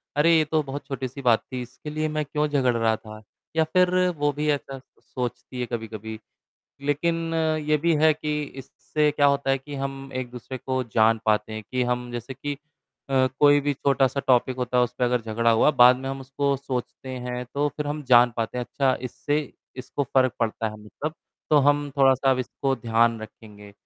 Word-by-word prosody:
अरे! 165 +3 +5
ये 155 - +3
तो 155 +1 +1
बहुत 140 0 -6
छोटी-सी 135 0 -5
बात 120 -3 +4
थी 125 - -3
इसके 125 +5 -9
लिए 155 +1 -1
मैं 155 - +1
क्यों 150 +1 -1
झगड़ 130 -4 +1
रहा 110 -1 +2
था? 110 -1 -11 0.3
या 160 - +4
फिर 180 0 +4 0.2
वो 145 0 +1
भी 150 +1 -2
ऐसा 135 -2 -4 0.2
सोचती 125 0 -6
है, 125 - -1
कभी-कभी? 110 -1 -6 0.6
लेकिन 165 +3 -1
अ, 160 -1 +1
ये 150 0 +1
भी 165 +1 +2
है 155 -1 +6
कि 150 -1 -3
इससे 145 +2 -2
क्या 145 -1 +2
होता 140 -1 +2
है 135 - +2
कि 145 +2 -9
हम 135 0 -5
एक-दूसरे 125 0 -5
को 130 0 -2
जान 110 0 +3
पाते 110 0 +1
हैं 110 0 -6
कि 130 -1 +1
हम 125 0 -2
जैसे 120 +2 -6
कि 145 +2 -4 0.6
अ, 130 -1 +3
कोई 145 0 +6
भी 145 0 0
छोटा-सा 135 0 +1
टॉपिक 130 0 +3
होता 125 0 -1
है 125 - +5
उस 120 - -3
पे - - +2
अगर 125 -1 +1
झगड़ा 115 +1 +1
हुआ, 115 +7 +4
बाद 125 -1 +7
में 135 +1 -5
हम 135 0 -5
उसको 140 +1 -1
सोचते 130 -1 -5
हैं 125 0 -4
तो 145 +1 +1
फिर 150 -1 -2
हम 150 0 -3
जान 120 0 +7
पाते 115 +2 -2
हैं 125 - -2
अच्छा 135 -2 +1
इससे 145 +4 -1 0.4
इसको 130 +3 -3
फ़र्क 130 -2 +4
पड़ता 115 -1 -1
है 105 - -10
मतलब। 150 +8 -5 0.4
तो 150 - +6
हम 145 +1 +2
थोड़ा-सा 135 0 +4
इसको 135 +1 -2
ध्यान 115 -1 +2
रखेंगे। 105 -2 -12
135 Hz, 200 wpm, -25 LUFS, 120-145 Hz, 0.6 s, बाद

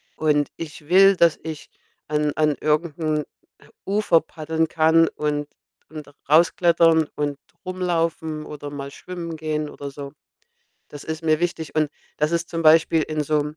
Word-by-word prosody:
und 150 -2 +1
ich 150 -2 -9
will, 195 +1 +7
dass 170 -3 +3
ich 160 -2 -7 0.4
an 150 -1 0
an 150 -1 +2
irgend 155 +1 0
'n 155 -2 -1 0.6
Ufer 200 -4 +3
paddeln 160 0 -2
kann 160 +1 +4
und 150 -1 -2 0.4
und 155 -2 -9 0.2
rausklettern 165 0 +4
und 145 -1 -2 0.3
rumlaufen 165 -4 -2
oder 145 -1 -8
mal 140 -1 -7
schwimmen 170 0 -7
gehen 155 -1 -3
oder 140 -1 -7
so. 140 0 -8 0.8
Das 145 -1 -10
ist 160 +1 -5
mir 155 0 +2
wichtig 170 -2 -3
und 155 -2 +1 0.3
das 150 +1 0
ist 170 0 -1
zum 165 -1 -3
Beispiel 160 0 +5
in 155 0 -2
so 155 +1 +1
'nem 150 +1 -7
155 Hz, 155 wpm, -22 LUFS, 150-165 Hz, 0.8 s, will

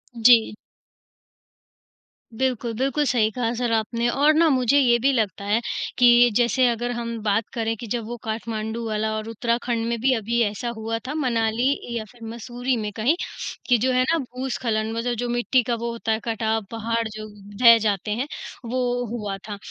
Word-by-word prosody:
जी। 230 -2 +5 1.8
बिल्कुल। 245 -2 -1
बिल्कुल, 275 +4 +1
सही 235 -5 +2
कहा 235 0 -1
सर 240 -1 -1
आपने, 230 +2 0
और 290 +5 +4
ना 325 +1 +4
मुझे 260 0 +3
ये 240 -3 +4
भी 275 +3 +3
लगता 210 -5 -1
है 210 +3 +2 0.4
कि 245 -1 +6
जैसे 245 +2 +3
अगर 240 +1 -1
हम 235 -1 -4
बात 210 +1 +2
करें 225 -2 -1
कि 235 - -8
जब 230 +1 -3
वो 240 +2 -6
काठमांडू 220 0 -4
वाला 215 0 -1
और 215 0 -5
उत्तराखंड 235 0 -1
में 235 -1 -1
भी 265 +1 +3
अभी 230 +1 0
ऐसा 220 +3 -2
हुआ 225 +1 -2
था, 280 - -3
मनाली 235 -3 +1 0.3
या 220 - -3
फिर 240 -2 -16
मसूरी 245 +2 -3
में 210 -2 -3
कहीं 235 +9 +2 0.5
कि 245 - +5
जो 255 +4 +1
है 255 0 +3
ना 330 - +3
भूस्खलन 245 -5 -2
मतलब 235 +2 -1
जो 245 - -2
मिट्टी 240 +1 +2
का 235 +1 -1
वो 235 +1 -3
होता 230 -1 -3
है 220 - +1
कटाव 225 -1 -1
पहाड़ 230 0 -1
जो 215 0 -8 0.4
बह 230 -1 +9
जाते 210 -1 -1
हैं, 245 +6 -1 0.4
वो 245 0 -1
हुआ 205 -4 -4
था। 205 - -5
235 Hz, 185 wpm, -23 LUFS, 220-245 Hz, 1.8 s, बह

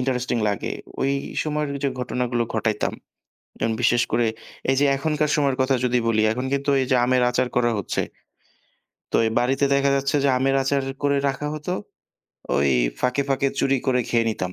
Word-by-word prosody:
Interesting 125 -2 -1
লাগে। 100 - -2 0.3
ওই 135 +1 +1 0.3
সময়ের 150 -1 -2 0.2
যে - - +3
ঘটনাগুলো 125 -1 -1
ঘটাইতাম। 110 -1 0 0.7
এবং 115 - +1
বিশেষ 120 0 +4
করে 115 0 +2 0.4
এই 135 - +2
যে - - +4
এখনকার 150 +1 0
সময়ের 140 -3 +1
কথা 130 +1 +2
যদি 125 0 +2
বলি 110 -1 +2
এখন 125 +3 -3
কিন্তু 140 +1 0
এই 130 - 0
যে 130 - +4
আমের 125 0 +2
আচার 125 0 0
করা 120 -1 +3
হচ্ছে। 100 - -2 1.1
তো - - -16
ওই 115 - +2
বাড়িতে 135 +3 +1
দেখা 140 0 +3
যাচ্ছে 140 +1 0
যে - - +4
আমের 135 +1 +1
আচার 140 0 +1 0.2
করে 140 0 +2
রাখা 140 +2 -3
হতো। 155 +4 -4 0.8
ওই 70 -1 +3 0.3
ফাঁকে, 125 +3 +1
ফাঁকে 135 0 +1
চুরি 135 0 +2
করে 125 -1 +3
খেয়ে 115 -1 +2
নিতাম। 90 -4 -4
130 Hz, 180 wpm, -23 LUFS, 120-140 Hz, 1.1 s, বিশেষ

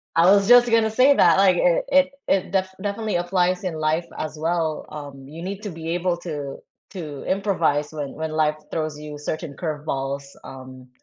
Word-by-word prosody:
I 165 +1 +5
was 200 0 +5
just 245 0 +7
gonna 225 -1 +3
say 260 +5 +5
that, 170 -7 +5
like, 190 -2 +5
it 170 -1 +2
it 275 0 +4 0.2
it 190 -2 +1
def 190 -1 +1
definitely 210 +1 -2
applies 180 +1 +1
in 180 -3 -2
life 155 +2 0
as 155 0 -5
well. 160 -1 -1
Um, 140 -3 -9
you 155 +4 -9
need 195 +3 -5
to 210 - -4
be 165 0 -7
able 175 0 0
to 150 -5 -6 0.3
to 155 -7 -7
improvise 180 -7 0
when 145 -3 -5
when 160 0 -4
life 155 -1 +1
throws 155 -2 -3
you 150 -1 -8
certain 150 0 -5
curveballs. 140 -3 -3 0.2
Um, 130 -1 -11
165 Hz, 185 wpm, -23 LUFS, 150-190 Hz, 0.3 s, just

